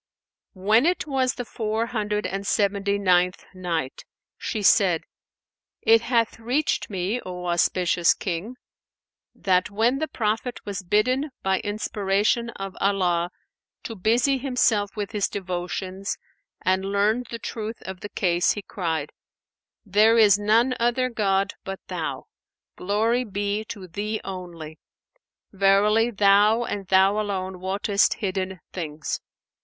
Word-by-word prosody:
When 215 - +3
it 360 -3 0
was 265 -3 0
the 245 - -5
Four 220 0 -2
Hundred 210 -3 -2
and 195 +1 -3
Seventy 200 0 +1
ninth 180 -2 +2
Night, 170 -7 -3 0.3
She 215 -4 -4
said, 185 -4 +4 0.8
It 225 0 +6
hath 230 -2 0
reached 250 +7 0
me, 195 +5 -2
O 180 -1 -6
auspicious 175 0 +2
King, 190 +6 -4 0.8
that 185 -1 +1
when 230 +6 +1
the 315 - -1
Prophet 225 +1 -2
was 200 -1 -4
bidden 255 - +1
by 190 0 +1
inspiration 205 +2 0
of 195 -1 -6
Allah 180 -3 +1 0.5
to 230 - -5
busy 240 +7 +2
himself 245 -6 +1
with 205 -2 -4
his 210 -3 0
devotions 185 +1 -4 0.5
and 185 +1 +2
learned 205 +5 +1
the 230 - -4
truth 225 -1 -5
of 190 -1 -7
the 205 - -7
case, 175 -3 +1
he 205 - -6
cried, 160 -7 -3 0.7
"There 215 +3 +4
is 205 -3 +6
none 225 +5 +3
other 245 +2 +1
god 195 -3 +1
but 195 0 -6
Thou! - - -3 0.5
Glory 220 +6 +1
be 205 0 -2
to 200 -4 -8
Thee 210 +5 -3
only! 175 -5 -8 0.7
Verily, 205 +4 +3
Thou 210 +2 +4
and 200 -4 -4
Thou 190 +2 +4
alone 190 -3 -3
wottest 200 +2 +1
hidden 190 -2 -3
things." 155 -4 -4
200 Hz, 130 wpm, -24 LUFS, 185-225 Hz, 0.8 s, It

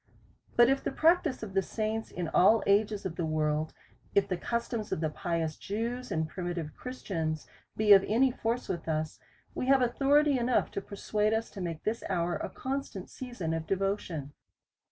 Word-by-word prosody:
But 240 0 +7
if 270 +1 +2
the - - -1
practice 320 -6 +3
of 200 -3 -6
the 195 - +3
saints 220 +2 -3
in 175 -2 -4
all 215 +7 +5
ages 205 0 +2
of 170 -3 -4
the 170 - 0
world, 155 0 0 0.4
if 200 0 +4
the 185 - -1
customs 230 +2 -3
of - - 0
the 155 -1 -1
pious 165 -1 -2
Jews 235 +5 -3
and 160 -1 0
primitive 175 -2 -4
Christians 165 - -3 0.3
be 210 -1 +7
of 195 -1 +7
any 250 +5 +4
force 235 0 -2
with 170 -2 -4
us, 155 0 -2 0.3
we 255 - -3
have 270 -1 +5
authority 280 +3 +3
enough 245 +1 +1
to 200 - -3
persuade 210 +2 -1
us, 225 +1 -1
to 195 - -7
make 165 -3 -4
this 220 +2 -2
hour 175 -2 0
a - - -4
constant 265 -8 -5
season 240 -11 -4
of 165 -1 -3
devotion. 185 -7 -2
200 Hz, 180 wpm, -30 LUFS, 170-235 Hz, 0.4 s, But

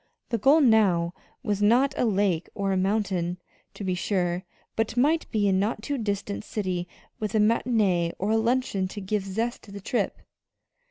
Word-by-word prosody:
The 230 -2 -1
goal 280 +9 +5
now 195 - +4 0.3
was 210 -4 -1
not 250 +7 +4
a - - +1
lake 195 -6 +1
or 195 -1 -1
a - - +1
mountain, 185 -3 0 0.4
to - - -7
be 185 -1 0
sure; 180 -1 -1 0.3
but 225 +1 -1
might 305 +6 +2
be 210 -3 +1
a 195 - +3
not 210 +3 0
too 280 +2 -2
distant 205 -1 -3
city 185 -5 -3 0.3
with 215 0 -3
a - - +4
matinée 210 -6 +2
or 200 +3 -1
a 225 - +3
luncheon 230 -4 0
to 205 - -7
give 205 +1 -2
zest 225 +5 -3
to 205 - -14
the 200 - -7
trip. 235 +5 -1
205 Hz, 180 wpm, -26 LUFS, 190-225 Hz, 0.4 s, goal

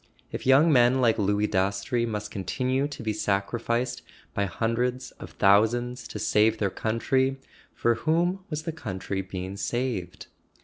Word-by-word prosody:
If - - -5
young 145 +5 +6
men 125 0 +5
like 115 -3 +3
Louis 105 +1 +2
Dastrey 100 +5 0
must 105 -1 -4
continue 130 +8 -1
to 140 -5 -8
be 110 -1 -1
sacrificed 115 +4 -1 0.3
by 100 0 0
hun¬ 115 +5 -1
dreds 125 +1 -2
of - - -10
thousands 115 +5 +2
to - - -7
save 110 +1 +2
their 100 -3 0
country, 130 +6 0 0.4
for 120 - +2
whom 170 +8 0
was 155 -1 -4
the 165 - -3
country 100 - -4
being 95 +1 -6
saved? 110 -4 -3
115 Hz, 150 wpm, -26 LUFS, 100-130 Hz, 0.4 s, young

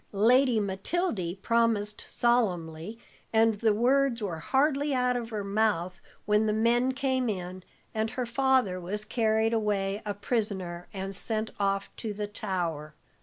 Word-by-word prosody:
Lady 240 +3 +4
Matildy 195 - -2
promised 225 -3 +1
solemnly, 195 -5 0 0.3
and 225 -1 +3
the 225 -1 +3
words 250 +3 +2
were 185 -7 -3
hardly 280 - +1
out 250 0 +2
of 235 -2 -3
her 215 -3 -3
mouth 195 -3 0 0.2
when 210 +1 +3
the 215 - +1
men 240 +4 +2
came 260 -2 0
in, 185 -2 -4 0.3
and 220 0 0
her 250 +1 -3
father 250 -6 +2
was 205 +4 -4
carried 220 0 +1
away 205 -2 0
a 205 -1 -3
prisoner 190 -5 -2
and 195 0 -4
sent 220 +2 -2
off 195 0 -1
to 220 -3 -4
the 210 0 -2
Tower. 175 -7 -4
215 Hz, 145 wpm, -28 LUFS, 195-240 Hz, 0.3 s, Lady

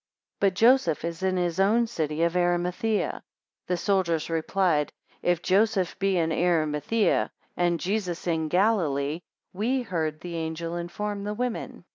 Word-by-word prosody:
But 195 -2 +2
Joseph 225 - +4
is 170 0 -4
in 190 -1 +1
his 175 0 -1
own 220 +5 +4
city 160 -8 -2
of 170 +1 +1
Arimathaea. 180 +4 +1
14 - - -10 0.5
The 180 - 0
soldiers 170 -4 0
replied, 165 -2 +1 0.3
If 175 -1 +1
Joseph 195 -2 +2
be 195 -1 +2
in 165 -1 +1
Arimathaea, 165 +4 +1 0.3
and 175 -1 +1
Jesus 185 -3 -2
in 160 -2 0
Galilee, 165 -6 +1 0.3
we 245 +7 0
heard 160 -7 -2
the 170 -1 -5
angel 165 +1 -3
inform 200 +4 -4
the 210 +1 -3
women. 245 0 -4
175 Hz, 145 wpm, -26 LUFS, 165-200 Hz, 0.5 s, Joseph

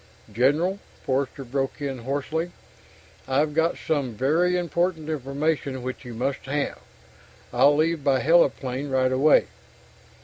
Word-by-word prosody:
_ - - -17
"General," 150 - +2 0.3
Forster 135 +1 -1
broke 135 +2 -2
in 135 -3 -3
hoarsely. 145 +7 -2 0.8
"I've 145 +3 +1
got 165 +2 +1
some 140 -7 -2
very 165 +10 +2
important 170 -2 -1
information 140 -2 -2
which 130 +2 -5
you 120 -2 -8
must 135 +3 -3
have. 145 +1 -2 0.7
I'll 145 +1 +5
leave 160 0 +1
by 135 -2 +3
heliplane 140 -3 +2
right 130 -1 +2
away." 140 +4 +5
140 Hz, 130 wpm, -25 LUFS, 130-160 Hz, 0.8 s, I'll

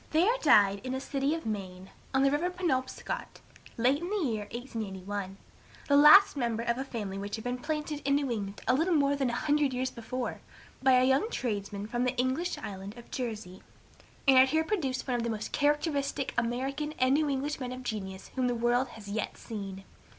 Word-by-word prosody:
There 350 +9 +3
died 200 - +5
in 260 0 -3
a - - -2
city 275 +2 -1
of 330 - -7
Maine, 190 -3 -5 0.2
on 265 0 +2
the 275 - +4
river 310 +5 +1
Penobscot, 335 -8 -3 0.4
late 255 +6 +2
in 350 - -4
the 420 - -1
year 215 -3 -2
1881, 205 -5 -5 0.5
the 285 - +4
last 305 +8 +8
member 235 -4 -1
of 235 +1 0
a - - -1
family 210 -7 -5
which 200 +1 -4
had 220 - -8
been 245 0 -3
planted 300 +1 -3
in 275 +1 +2
New 280 -3 0
England 200 -3 -4
a - - +4
little 330 +6 +2
more 285 -1 +3
than 270 -3 0
a - - -3
hundred 290 +1 +1
years 255 +1 -1
before, 240 +2 -5 0.4
by 265 0 +5
a 255 0 +5
young 265 - +3
tradesman 205 - -3
from 240 +3 -1
the 250 0 -1
English 260 +8 0
island 195 +2 -7
of 240 - -13
Jersey, 215 -7 -5 0.7
and 265 -1 +8
had 260 +1 +6
here 315 +2 +2
produced 290 -10 -2
one 250 -2 +1
of 235 - -2
the 235 - -1
most 220 -1 -4
characteristic 290 -2 0
American 270 +6 -1
and 255 -3 +2
New 300 +1 +2
English 280 +2 -2
men 250 -2 -4
of 255 0 -7
genius 190 -5 -5
whom 255 -1 +1
the 245 - 0
world 240 +2 +2
has 210 -2 -11
yet 205 +1 -3
seen. 195 -4 -7
255 Hz, 205 wpm, -30 LUFS, 220-285 Hz, 0.7 s, last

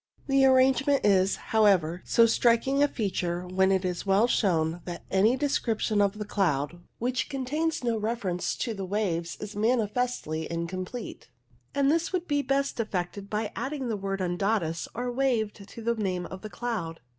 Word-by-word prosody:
The 270 -1 +4
arrangement 265 +1 +4
is, 195 -1 +4 0.2
however, 185 -6 +3
so 230 - +5
striking 235 +4 +3
a 290 - +6
feature 180 -7 -2
when 190 +1 +2
it 190 -1 +1
is 180 -1 -2
well 200 +3 +4
shown 175 -7 +1
that 175 -1 -7
any 210 +7 +4
description 225 -6 0
of 200 +1 +1
the 210 - -4
cloud 175 -6 0 0.2
which 245 -1 -1
contains 295 +3 -2
no 235 -2 +1
reference 210 -5 -2
to 230 - -2
the 195 -2 -5
waves 180 -4 -2
is 210 0 -7
manifestly 220 -7 0
incomplete, 185 +7 -5 0.5
and 280 0 +3
this 330 +1 0
would 360 -2 -2
be 290 -1 +1
best 275 -1 -1
effected 200 -2 -3
by 215 0 -2
adding 265 0 -3
the 220 - 0
word 195 -1 -3
undatus 175 -2 -1
or 245 +1 -2
waved 230 -6 -1
to 230 - -9
the 235 +1 +2
name 185 -5 -2
of 190 0 -8
the 215 - -7
cloud. 205 -9 -4
210 Hz, 170 wpm, -27 LUFS, 185-250 Hz, 0.5 s, a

